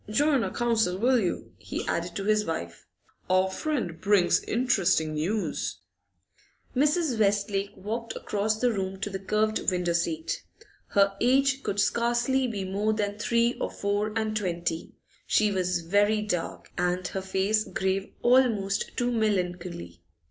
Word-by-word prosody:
Join 280 +3 +3
our - - -1
council, 220 -6 +1
will 250 +4 +3
you?' 180 -5 -2
he - - -5
added 170 +1 -2
to 195 - -3
his 215 +1 +2
wife. 85 - -5 0.4
'Our 185 +1 +3
friend 225 - -3
brings 200 -3 +3
interesting 195 -10 +2
news.' 185 +8 -2 1.0
Mrs. 295 -2 +2
Westlake 200 -1 +1
walked 225 +4 -4
across 215 +1 -1
the 245 0 +3
room 190 -2 -3
to 205 - -2
the 190 - -4
curved 215 +3 +1
window 180 -2 0
seat. 165 -2 -1 0.5
Her 200 0 +3
age 270 +2 +3
could 205 -5 -2
scarcely 240 +4 +2
be 205 -5 -3
more 205 +3 0
than 205 -1 -2
three 235 +2 +2
or - - 0
four 205 +1 -1
and 220 -1 -1
twenty; 170 -5 -2 0.3
she 210 -1 +3
was 180 -2 0
very 205 +5 +2
dark, 180 -5 -3
and 180 0 0
her 190 - -3
face 190 +3 +1
grave 190 +1 -1 0.2
almost 230 -6 +2
to 245 -1 +1
melancholy. 180 - -2
205 Hz, 145 wpm, -27 LUFS, 185-230 Hz, 1.0 s, Join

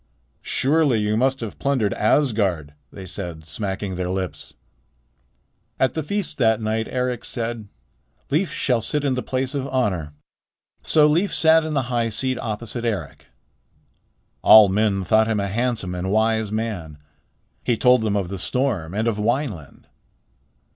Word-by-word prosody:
"Surely 140 -4 +2
you 105 0 0
must 130 +3 +1
have 115 -3 -6
plundered 130 -7 0
Asgard," 105 - +1 0.2
they 95 - -9
said, 85 -4 -5
smacking 95 +3 -4
their 90 -1 -2
lips. 95 -1 -5 1.2
At 130 -2 +2
the 160 - -2
feast 180 0 -4
that 110 -3 +3
night 110 0 -1
Eric 125 -2 -2
said: 115 -3 -4 0.6
"Leif 165 +6 +1
shall 125 -3 0
sit 145 +5 -2
in 135 - +1
the 125 - -2
place 130 +2 -3
of 135 -2 -2
honor." 95 - -1 0.7
So 155 -2 +4
Leif 170 +7 +2
sat 160 0 +4
in 155 -1 -3
the 135 - +1
high 115 -1 +1
seat 130 +4 -2
opposite 115 +1 -5
Eric. 115 -4 -4 1.1
All 110 -2 +8
men 100 -1 +1
thought 110 +4 +3
him 110 -2 0
a 100 - -1
handsome 115 -3 -1
and 90 +1 -3
wise 110 0 +1
man. 105 -9 -4 0.7
He 120 - +1
told 125 0 +4
them 105 -2 0
of 95 -4 -1
the 100 -1 -5
storm 105 -11 -1
and 110 +2 0
of 110 -2 -1
Wineland. 110 - -2
110 Hz, 155 wpm, -22 LUFS, 100-130 Hz, 1.2 s, All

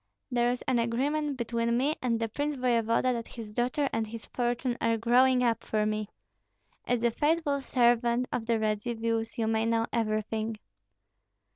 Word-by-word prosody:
"There 240 -1 +2
is 245 0 -2
an 255 -2 +1
agreement 275 +5 0
between 235 0 0
me 285 +5 +1
and 235 -3 0
the 225 - 0
prince 290 +6 -2
voevoda 245 -1 +2
that 230 -1 -4
his 220 -3 -9
daughter 250 +5 0
and 225 -1 -1
his 225 0 -8
fortune 245 0 -1
are 230 0 +2
growing 250 +3 +4
up 230 -2 +1
for 215 -1 0
me. 215 -1 -2 0.8
As 240 -1 0
a 235 - +3
faithful 295 +1 +1
servant 240 -1 +2
of 225 -2 -3
the 230 -1 +2
Radzivills, 225 +1 -1
you 225 - 0
may 220 0 +1
know 230 0 +2
everything." 220 0 -1
235 Hz, 165 wpm, -29 LUFS, 225-250 Hz, 0.8 s, growing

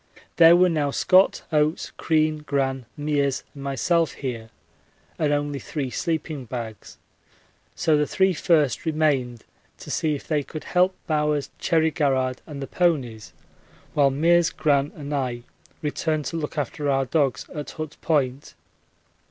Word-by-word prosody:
There 170 0 +8
were 180 +1 +5
now 155 -4 0
Scott, 185 +6 +3
Oates, 155 +1 +1
Crean, 155 -1 +1
Gran, 135 -4 -2
Meares, 145 -2 0
and 140 - -10
myself 160 +5 +1
here 115 -5 -5 0.7
and 150 -2 +1
only 145 -1 -1
three 135 -4 -4
sleeping 155 -4 -3
bags, 115 -3 -7 0.8
so 160 -3 +2
the 150 0 +2
three 190 0 +2
first 155 -6 +2
remained 145 -7 0 0.3
to - - -9
see 155 -2 0
if 140 - -9
they 150 -2 +1
could 155 +2 -8
help 185 +1 +2
Bowers, 150 -3 0
Cherry 160 -1 +2
Garrard, 130 -4 0
and 140 -3 -6
the - - -3
ponies, 135 -11 -1 0.6
while 140 -2 +4
Meares, 165 +5 +3
Gran, 145 -1 +1
and 145 -1 -6
I 125 -4 -2 0.4
returned 150 0 -1
to - - -4
look 155 0 -5
after 145 +1 -2
our 135 -1 +2
dogs 135 -3 0
at 150 -1 -5
Hut 155 -1 -6
Point. 140 -4 -1
150 Hz, 145 wpm, -24 LUFS, 135-160 Hz, 0.8 s, There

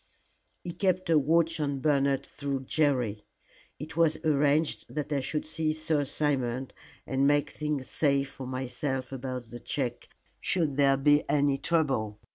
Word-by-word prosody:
"He 175 - -4
kept 185 -2 0
a 155 - +6
watch 165 +3 +2
on 140 -2 -1
Bernard 140 -1 +2
through 140 -2 -4
Jerry. 130 -7 0 0.6
It 150 +2 -8
was 165 -2 +3
arranged 150 +1 +2
that 150 0 -3
I 140 - +1
should 145 +3 -2
see 155 0 -1
Sir 155 -2 0
Simon 130 -3 -1 0.3
and 135 +1 +1
make 145 0 +2
things 150 -3 -3
safe 140 -2 +1
for 130 -2 -8
myself 130 +1 -3
about 130 -3 -5
the 120 - -7
check 120 0 -3 0.3
should 160 -7 0
there 135 -1 +4
be 145 +2 +4
any 140 -1 +2
trouble. 135 -12 0
140 Hz, 150 wpm, -29 LUFS, 130-155 Hz, 0.6 s, a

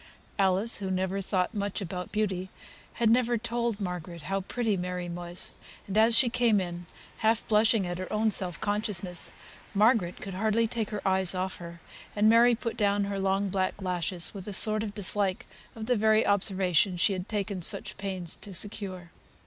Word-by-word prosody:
Alice, 195 +3 +2
who 195 -2 -4
never 190 +1 -1
thought 185 +1 0
much 200 -2 -2
about 180 -2 -5
beauty, 190 -4 -1 0.5
had 235 - +1
never 240 +1 +3
told 235 -1 -2
Margaret 180 -3 -5
how 195 +4 -1
pretty 225 +2 -1
Mary 180 -1 -3
was; 175 +1 -4 0.3
and, 195 - -5
as 225 +1 +5
she 260 - +5
came 235 -3 +3
in 175 -1 -5 0.3
half 220 0 +1
blushing 215 -1 +3
at 175 0 -4
her 185 - -5
own 215 +1 +2
self 180 -5 +2
consciousness, 205 -4 -1 0.4
Margaret 210 -4 +3
could 195 - -7
hardly 220 +4 +1
take 220 -2 -3
her 210 -2 -3
eyes 190 -1 +2
off 185 +1 -2
her, 170 -1 -10 0.3
and 210 +1 +4
Mary 235 +2 +6
put 230 0 -4
down 205 -1 +2
her 200 0 -3
long 195 +1 +1
black 190 +1 -1
lashes 180 -2 -2
with 195 -2 -8
a 205 - -4
sort 215 +2 +4
of 210 -2 -5
dislike 200 -1 +1 0.3
of 220 -1 -6
the 250 +2 +2
very 220 0 +3
observation 190 -2 +2
she 195 +4 +2
had 185 -1 -5
taken 200 -3 -2
such - - -1
pains 190 -4 -4
to 200 -3 -9
secure. 185 -3 -4
195 Hz, 180 wpm, -28 LUFS, 185-215 Hz, 0.5 s, Mary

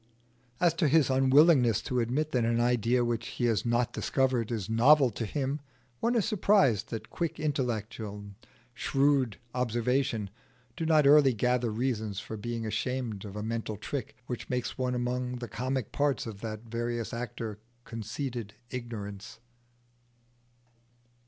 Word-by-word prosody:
As 175 -2 +4
to 155 - +5
his 145 -2 +4
unwillingness 130 - +5
to 125 - -1
admit 135 +7 0
that 125 -4 +1
an 115 +1 +1
idea 120 0 +2
which 120 -1 -2
he 120 - -2
has 115 -2 +1
not 120 0 +1
discovered 130 -4 0
is 110 -5 -2
novel 125 +4 +5
to 110 +1 -4
him, 140 +4 -2 0.4
one 235 +2 +1
is 225 - +2
surprised 195 - +3
that 110 -1 -6
quick 165 -2 -3
intellect 125 -8 -2
and 100 -2 -7 0.4
shrewd 135 -2 +1 0.2
observation 120 -3 0 0.4
do 165 - -2
not 155 -2 +5
early 140 -2 +7
gather 125 +1 +1
reasons 110 -3 -2
for 110 - -7
being 115 +1 -4
ashamed 110 -1 -2
of 100 -1 -8
a 105 - -4
mental 110 -1 -3
trick 125 +3 -5
which 125 -1 -5
makes 125 -1 -2
one 125 -1 -1
among 125 +1 -2
the 120 -1 -6
comic 130 0 -3
parts 145 -3 0
of 105 -3 -7
that 110 -2 -5
various 120 +1 -3
actor 115 -3 -5 0.3
Conceited 115 -1 -5 0.2
Ignorance. 105 -6 -6
120 Hz, 145 wpm, -29 LUFS, 110-135 Hz, 0.4 s, early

